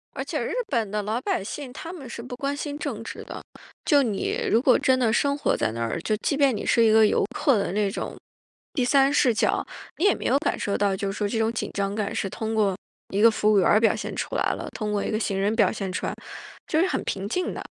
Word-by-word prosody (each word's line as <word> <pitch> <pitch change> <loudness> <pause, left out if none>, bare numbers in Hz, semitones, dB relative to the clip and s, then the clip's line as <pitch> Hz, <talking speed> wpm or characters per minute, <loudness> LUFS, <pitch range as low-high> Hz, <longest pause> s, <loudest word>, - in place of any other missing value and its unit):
而 - - -3
且 - - -3
日 - - -3
本 230 - 0
的 210 0 -1
老 220 +3 -1
百 195 - -1
姓 260 +4 -6
他 330 +6 -8
们 275 -8 -9
是 235 - -6
不 250 +1 -7
关 275 +2 -2
心 290 0 -4
政 325 - -4
治 - - -7
的。 - - -8 0.4
就 290 -2 +5
你 210 -5 -1
如 225 - +3
果 255 -1 +5
真 260 0 +3
的 240 -3 +2
生 280 +5 +1
活 - - +1
在 110 - 0
那 115 +1 -5
儿， 115 +8 -2
就 215 - 0
即 280 - -1
便 275 -4 +3
你 - - -4
是 230 - +4
一 220 - +5
个 220 0 +6
游 - - +2
客 270 -7 +3
的 200 - -1
那 205 0 +1
种 - - -5 0.6
第 265 - 0
三 275 +1 +4
视 255 -4 +4
角， 225 - +1 0.3
你 345 - +1
也 405 - +5
没 - - -8
有 270 - +3
感 - - -1
受 200 - -1
到 200 -1 +1
就 195 0 -2
是 195 - -7
说 205 - 0
这 225 +2 -2
种 225 0 +1
紧 230 - -3
张 200 0 -1
感 210 -2 -2
是 195 - -1
通 220 +2 -4
过 205 -3 +2 0.3
一 200 +2 -1
个 230 - +8
服 215 0 +2
务 205 - +5
员 180 - +3
儿 210 - +5
表 225 - +3
现 - - -5
出 - - -4
来 - - +1
了， - - -6
通 210 -2 -3
过 205 -1 0
一 - - -2
个 215 - 0
行 195 -3 -1
人 205 +3 +1
表 210 -5 +3
现 195 -4 -4
出 185 - -3
来， - - -2 0.5
就 315 - +1
是 370 - +3
很 - - -2
平 195 0 -3
静 365 - -2
的， - - -6
220 Hz, 300 characters per minute, -25 LUFS, 205-265 Hz, 0.6 s, 个